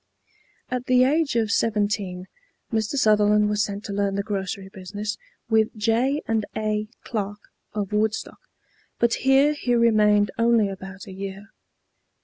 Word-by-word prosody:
At 250 0 -3
the 255 0 +5
age 290 +1 +2
of 225 -2 +1
seventeen 205 -5 0 0.5
Mr. 220 +3 0
Sutherland 210 -3 +4
was 210 0 +1
sent 205 0 -5
to 200 - -5
learn 200 -1 0
the 200 - -1
grocery 195 -2 -4
business 200 +2 -5 0.3
with 220 -1 +2
J. 240 +7 +1 0.2
& 205 - -7
A. 215 0 -1 0.2
Clark, 205 -3 -3 0.4
of 205 -1 -3
Woodstock; 215 +1 -1 0.6
but 235 0 +2
here 270 +3 +4
he 245 -4 0
remained 210 -3 +4
only 230 -3 +3
about 195 +1 -8
a 195 - -10
year. 195 +2 -7
210 Hz, 140 wpm, -24 LUFS, 200-230 Hz, 0.6 s, the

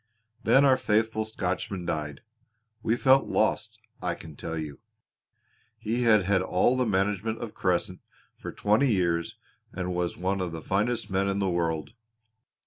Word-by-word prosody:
Then 140 +1 +5
our 130 -2 +5
faithful 110 -2 +1
Scotchman 95 -3 -3
died. 75 -3 -3 0.6
We 115 - +1
felt 135 +1 +4
lost, 110 +1 0 0.2
I 90 -1 -1
can 80 -2 -11
tell 80 +3 -5
you! 75 -3 -6 1.0
He 110 +2 -2
had 110 -4 +5
had 95 0 +2
all 95 +6 +2
the 130 -2 +1
management 105 +2 0
of 115 -3 -6
Crescent 90 0 -1 0.3
for - - -7
twenty 110 +6 +2
years 85 -4 0 0.3
and 90 -1 -3
was 90 -1 -2
one 95 +2 -1
of 90 -2 -3
the 80 - -6
finest 110 +3 -1
men 95 +1 +1
in 100 0 0
the 95 -2 0
world. 80 -3 -1
95 Hz, 155 wpm, -27 LUFS, 90-110 Hz, 1.0 s, Then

